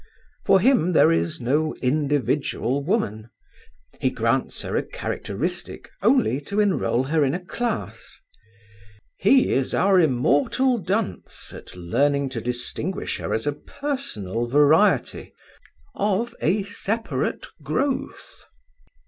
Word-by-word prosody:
For 190 Hz, -, +5 dB
him 190 Hz, -, +3 dB
there 155 Hz, -, +5 dB
is 85 Hz, 0 st, 0 dB
no 150 Hz, +6 st, 0 dB
individual 140 Hz, -1 st, 0 dB
woman. 115 Hz, -, -1 dB, 0.7 s
He -, -, +2 dB
grants -, -, -1 dB
her -, -, -4 dB
a -, -, +2 dB
characteristic 170 Hz, -, -5 dB
only 220 Hz, -, +3 dB
to 200 Hz, +5 st, -2 dB
enroll 190 Hz, -, +2 dB
her 150 Hz, +3 st, +1 dB
in 135 Hz, +3 st, +1 dB
a -, -, -2 dB
class. 235 Hz, +3 st, -4 dB, 1.0 s
He 260 Hz, +7 st, +4 dB
is 135 Hz, -1 st, 0 dB
our 190 Hz, -1 st, +4 dB
immortal 155 Hz, -, +2 dB
dunce 195 Hz, +3 st, -3 dB
at -, -, -11 dB
learning 135 Hz, +10 st, +1 dB
to 125 Hz, -3 st, -5 dB
distinguish 125 Hz, -, -3 dB
her -, -, -4 dB
as 110 Hz, -, -1 dB
a 145 Hz, -, 0 dB
personal 140 Hz, -, -4 dB
variety, 150 Hz, -, +3 dB, 0.6 s
of 210 Hz, +4 st, 0 dB
a 195 Hz, +6 st, +1 dB
separate 205 Hz, -, -3 dB, 0.2 s
growth. 265 Hz, -, -3 dB
155 Hz, 115 wpm, -23 LUFS, 130-205 Hz, 1.0 s, For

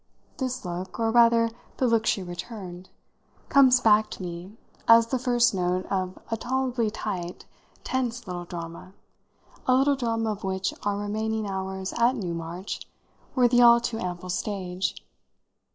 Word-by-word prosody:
This 255 Hz, -4 st, -3 dB
look, 180 Hz, +3 st, -5 dB
or 225 Hz, -1 st, +2 dB
rather 230 Hz, 0 st, +5 dB, 0.3 s
the 260 Hz, -, +1 dB
look 230 Hz, -2 st, +2 dB
she 195 Hz, -, +1 dB
returned, 180 Hz, 0 st, -8 dB, 0.6 s
comes 260 Hz, -2 st, +6 dB
back 215 Hz, -2 st, +4 dB
to 195 Hz, -, -7 dB
me 180 Hz, +4 st, -7 dB, 0.3 s
as 230 Hz, 0 st, +8 dB
the 255 Hz, +2 st, -1 dB
first 240 Hz, -1 st, +3 dB
note 180 Hz, 0 st, 0 dB
of 185 Hz, -1 st, -1 dB
a 225 Hz, -, 0 dB
tolerably 250 Hz, -1 st, 0 dB
tight, 180 Hz, -5 st, -5 dB, 0.4 s
tense 250 Hz, -2 st, -2 dB
little 180 Hz, -2 st, -5 dB
drama, 170 Hz, +1 st, -8 dB, 0.7 s
a 255 Hz, -, +5 dB
little 275 Hz, +2 st, +4 dB
drama 225 Hz, -3 st, -1 dB
of 210 Hz, +1 st, -6 dB
which 190 Hz, 0 st, -1 dB
our 205 Hz, -1 st, -1 dB
remaining 215 Hz, +1 st, -2 dB
hours 190 Hz, -1 st, -4 dB
at 235 Hz, +2 st, +3 dB
Newmarch 175 Hz, -2 st, -4 dB, 0.6 s
were 250 Hz, -2 st, +5 dB
the 245 Hz, 0 st, +4 dB
all 235 Hz, 0 st, +8 dB
too 235 Hz, -1 st, -3 dB
ample 180 Hz, 0 st, -5 dB
stage. 185 Hz, -1 st, -2 dB
210 Hz, 150 wpm, -26 LUFS, 185-235 Hz, 0.7 s, as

